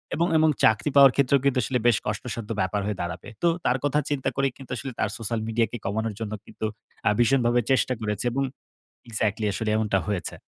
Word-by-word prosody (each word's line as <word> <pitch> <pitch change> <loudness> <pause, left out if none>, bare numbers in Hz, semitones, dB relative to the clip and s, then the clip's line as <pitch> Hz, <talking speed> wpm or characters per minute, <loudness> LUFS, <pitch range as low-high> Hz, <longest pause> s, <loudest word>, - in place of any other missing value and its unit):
এবং, 170 +2 +2
এবং 155 0 +4
চাকরি 110 +6 +4
পাওয়ার 135 -2 +9
ক্ষেত্রেও 140 0 +3
কিন্তু 135 -2 +2
আসলে 125 +3 0
বেশ 115 - +5
কষ্টসাধ্য 110 +1 -4
ব্যাপার 100 +2 0
হয়ে 105 -2 -3
দাঁড়াবে। 85 0 -5 0.2
তো - - +5 0.2
তার 125 - +3
কথা 145 +1 +2
চিন্তা 140 -3 0
করেই 135 -1 +1
কিন্তু 135 -2 -12
আসলে 135 +1 -5
তার 105 - +1
সোশ্যাল 115 0 -2
মিডিয়াকে 115 +1 0
কমানোর 110 +2 -1
জন্য 110 -1 -4
কিন্তু 110 - -6 0.4
আ - - +7
ভীষণভাবে 120 0 +3
চেষ্টা 130 -1 +2
করেছে 105 +1 -2
এবং 135 +2 0 0.7
এক্সাক্টলি 110 -1 -1
আসলে 110 +2 -2
এমনটা 105 -3 +1
হয়েছে। 100 -4 -2
115 Hz, 195 wpm, -25 LUFS, 105-135 Hz, 0.7 s, পাওয়ার